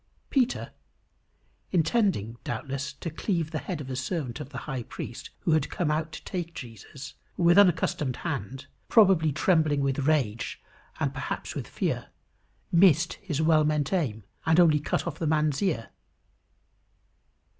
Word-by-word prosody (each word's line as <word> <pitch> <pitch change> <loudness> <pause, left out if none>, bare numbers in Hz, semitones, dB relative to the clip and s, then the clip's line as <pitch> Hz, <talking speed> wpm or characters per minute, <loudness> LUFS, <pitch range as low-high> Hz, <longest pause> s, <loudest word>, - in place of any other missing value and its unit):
Peter, 260 -2 +1 1.0
intending, 170 - +1
doubtless, 140 +3 -4
to 150 +4 -6
cleave 165 -1 -1
the 155 - -2
head 180 -5 -4
of 140 - -6
a 130 - -4
servant 130 -1 -3
of - - -7
the 140 - -8
high 135 -5 -3
priest - - -7
who - - 0
had 155 -2 +2
come 165 -4 -1
out 155 +1 -1
to 165 - -9
take 170 -3 -5
Jesus, 125 +2 -9 0.2
with 175 0 +5
unaccustomed 165 -8 +3
hand, 140 -4 -4 0.2
probably 190 -8 +5
trembling 155 -2 +2
with 140 0 0
rage 120 -7 0 0.4
and - - 0
perhaps - - -4
with - - -5
fear, - - -2 0.6
missed 170 -2 +5
his 160 -6 -2
well 155 -1 +5
meant 150 +1 0
aim, 120 - -1 0.2
and 160 +1 +4
only 160 -4 +6
cut 145 - -1
off 165 -1 -5
the 165 - -1
man's 150 -2 +1
ear. 160 - 0
155 Hz, 150 wpm, -27 LUFS, 135-170 Hz, 1.0 s, only